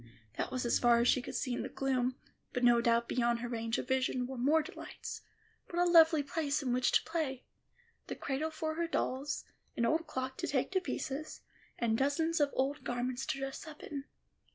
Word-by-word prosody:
That -, -, -2 dB
was 255 Hz, -1 st, -2 dB
as 235 Hz, -, +3 dB
far 240 Hz, -1 st, +5 dB
as 235 Hz, -, +3 dB
she 255 Hz, -, +4 dB
could -, -, -7 dB
see 255 Hz, -, -1 dB
in -, -, -2 dB
the -, -, -4 dB
gloom, 255 Hz, -2 st, 0 dB, 0.4 s
but 250 Hz, -, -1 dB
no 240 Hz, -1 st, +6 dB
doubt 235 Hz, 0 st, +2 dB
beyond 240 Hz, -1 st, +1 dB
her 240 Hz, -, -3 dB
range 230 Hz, -1 st, -2 dB
of -, -, -4 dB
vision 260 Hz, -1 st, +1 dB
were 265 Hz, +1 st, -6 dB
more 290 Hz, +6 st, +3 dB
delights. -, -, -8 dB, 0.5 s
What 345 Hz, -, -5 dB
a 350 Hz, -, +5 dB
lovely 325 Hz, -3 st, +7 dB
place 290 Hz, 0 st, -1 dB
in 250 Hz, -2 st, 0 dB
which 250 Hz, 0 st, +2 dB
to -, -, +5 dB
play! 295 Hz, -6 st, -2 dB, 0.6 s
The -, -, -4 dB
cradle 290 Hz, +3 st, -2 dB
for 315 Hz, 0 st, -3 dB
her 335 Hz, +1 st, -1 dB
dolls, 275 Hz, -3 st, -2 dB, 0.3 s
an 235 Hz, -, +2 dB
old 320 Hz, +6 st, +1 dB
clock 260 Hz, -1 st, -4 dB
to -, -, -2 dB
take 265 Hz, +3 st, 0 dB
to 375 Hz, -1 st, +2 dB
pieces, 310 Hz, -4 st, -4 dB, 0.4 s
and 225 Hz, -1 st, +1 dB
dozens 320 Hz, +4 st, +1 dB
of 290 Hz, -1 st, +4 dB
old 275 Hz, +3 st, 0 dB
garments 245 Hz, +1 st, -2 dB
to -, -, -1 dB
dress 270 Hz, +4 st, -5 dB
up 305 Hz, -1 st, -10 dB
in. 280 Hz, -2 st, -5 dB
265 Hz, 210 wpm, -33 LUFS, 245-310 Hz, 0.6 s, lovely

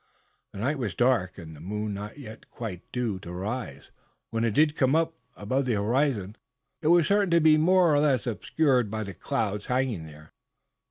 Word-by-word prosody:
The -, -, -11 dB
night 135 Hz, +8 st, -1 dB
was 105 Hz, -8 st, -3 dB
dark, 120 Hz, -7 st, +1 dB
and 80 Hz, -4 st, -10 dB
the -, -, -13 dB
moon 105 Hz, +4 st, -3 dB
not 105 Hz, +4 st, -7 dB
yet 110 Hz, -5 st, -11 dB
quite 100 Hz, -7 st, -6 dB
due 115 Hz, -6 st, -2 dB
to 85 Hz, -2 st, -9 dB
rise. 95 Hz, -, -5 dB, 0.4 s
When 115 Hz, 0 st, -1 dB
it 115 Hz, -3 st, 0 dB
did 150 Hz, 0 st, +4 dB
come 135 Hz, 0 st, +2 dB
up 165 Hz, 0 st, +1 dB, 0.2 s
above 130 Hz, +7 st, -1 dB
the 125 Hz, -, 0 dB
horizon 110 Hz, -1 st, 0 dB, 0.4 s
it 155 Hz, -, -1 dB
was 170 Hz, 0 st, +5 dB
certain 200 Hz, 0 st, +2 dB
to 170 Hz, 0 st, +4 dB
be 155 Hz, -1 st, +6 dB
more 175 Hz, +1 st, +4 dB
or 145 Hz, -, +4 dB
less 140 Hz, -6 st, +2 dB
obscured 125 Hz, 0 st, +1 dB
by 110 Hz, +1 st, -3 dB
the 100 Hz, -1 st, -7 dB
clouds 105 Hz, +2 st, -2 dB
hanging 125 Hz, -10 st, -1 dB
there. 75 Hz, 0 st, -15 dB
115 Hz, 195 wpm, -27 LUFS, 100-145 Hz, 0.4 s, be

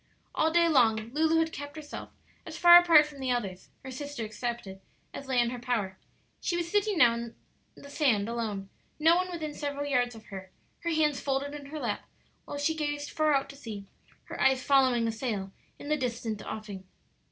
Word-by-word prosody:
All 315 Hz, -, +2 dB
day 340 Hz, +1 st, +4 dB
long 225 Hz, -6 st, +3 dB
Lulu 320 Hz, +2 st, +3 dB
had 325 Hz, 0 st, +1 dB
kept 285 Hz, 0 st, -7 dB
herself 305 Hz, -2 st, -8 dB, 0.3 s
as -, -, -8 dB
far 345 Hz, 0 st, +10 dB
apart 330 Hz, -4 st, +6 dB
from 295 Hz, -2 st, -12 dB
the 260 Hz, -1 st, -2 dB
others 200 Hz, -7 st, -3 dB
her 265 Hz, -, -7 dB
sister 285 Hz, -2 st, -5 dB
excepted 215 Hz, -3 st, -5 dB, 0.3 s
as 275 Hz, -, -8 dB
lay 260 Hz, -2 st, +1 dB
in 240 Hz, 0 st, +2 dB
her 250 Hz, -, -5 dB
power. 220 Hz, -6 st, -2 dB, 0.4 s
She 345 Hz, -, -1 dB
was 345 Hz, -1 st, -3 dB
sitting 415 Hz, -1 st, +1 dB
now 240 Hz, -6 st, +6 dB
alone 235 Hz, 0 st, -6 dB, 0.4 s
in -, -, -14 dB
the 280 Hz, -, -11 dB
sand, 245 Hz, -10 st, +2 dB
no 230 Hz, -, -1 dB
one 365 Hz, +1 st, -1 dB
within 310 Hz, -4 st, -4 dB
several 285 Hz, -1 st, -4 dB
yards 245 Hz, -4 st, 0 dB
of 220 Hz, -, -13 dB
her, 190 Hz, -1 st, -7 dB, 0.3 s
her 340 Hz, -, -3 dB
hands 305 Hz, -3 st, +1 dB
folded 280 Hz, +1 st, -1 dB
in 290 Hz, -1 st, -8 dB
her 305 Hz, +2 st, -6 dB
lap, 235 Hz, -6 st, -3 dB, 0.4 s
while 285 Hz, -, -6 dB
she 290 Hz, +3 st, +1 dB
gazed 290 Hz, -2 st, -3 dB
far 310 Hz, -2 st, +2 dB
out 275 Hz, 0 st, 0 dB
to -, -, -14 dB
sea, 215 Hz, -7 st, -8 dB, 0.4 s
her -, -, -7 dB
eyes 265 Hz, -1 st, +3 dB
following 255 Hz, -4 st, +3 dB
a -, -, 0 dB
sail 220 Hz, -5 st, -3 dB, 0.3 s
in 290 Hz, -, -9 dB
the 305 Hz, -, +2 dB
distant 235 Hz, -5 st, -3 dB
offing. 205 Hz, -3 st, -6 dB
270 Hz, 200 wpm, -29 LUFS, 230-305 Hz, 0.4 s, far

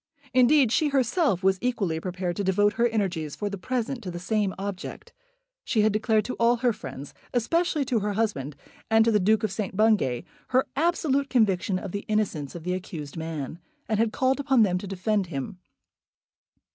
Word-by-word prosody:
Indeed, 255 Hz, 0 st, +5 dB
she 310 Hz, -, +3 dB
herself 265 Hz, -, +1 dB
was 190 Hz, 0 st, +3 dB
equally 200 Hz, -10 st, -1 dB
prepared 180 Hz, 0 st, -3 dB
to 200 Hz, -, -1 dB
devote 205 Hz, +2 st, +3 dB
her 240 Hz, 0 st, +2 dB
energies 185 Hz, -9 st, -2 dB
for 205 Hz, -1 st, -3 dB
the 200 Hz, -, -4 dB
present 250 Hz, +3 st, -2 dB
to 195 Hz, -, -6 dB
the 175 Hz, -, -5 dB
same 205 Hz, +2 st, 0 dB
object. 195 Hz, -1 st, -6 dB, 0.5 s
She 220 Hz, -, +1 dB
had 215 Hz, -1 st, +3 dB
declared 215 Hz, 0 st, +2 dB
to 255 Hz, -, -3 dB
all 235 Hz, +1 st, +4 dB
her 240 Hz, 0 st, +1 dB
friends, 135 Hz, -6 st, -8 dB, 0.2 s
especially 315 Hz, +4 st, +1 dB
to 240 Hz, -3 st, +1 dB
her 205 Hz, 0 st, -2 dB
husband 175 Hz, -11 st, -1 dB, 0.3 s
and 225 Hz, 0 st, +5 dB
to 230 Hz, -, +3 dB
the 210 Hz, -, +3 dB
Duke 215 Hz, +3 st, +2 dB
of 215 Hz, -, 0 dB
St. 195 Hz, -1 st, -4 dB
Bungay, 210 Hz, -, +2 dB, 0.2 s
her 260 Hz, +1 st, +2 dB
absolute 285 Hz, -3 st, +1 dB
conviction 195 Hz, -6 st, +2 dB
of 190 Hz, 0 st, -6 dB
the 200 Hz, +2 st, -5 dB
innocence 190 Hz, -10 st, -1 dB
of 170 Hz, -, -7 dB
the 180 Hz, +1 st, -1 dB
accused 165 Hz, -6 st, -6 dB
man, 160 Hz, -2 st, -5 dB, 0.3 s
and 215 Hz, -4 st, 0 dB
had 225 Hz, -1 st, +2 dB
called 260 Hz, +4 st, +1 dB
upon 265 Hz, -4 st, +4 dB
them 180 Hz, -3 st, +1 dB
to 200 Hz, -, -7 dB
defend 195 Hz, +1 st, -1 dB
him. 150 Hz, +3 st, -5 dB
210 Hz, 190 wpm, -26 LUFS, 180-240 Hz, 0.5 s, Indeed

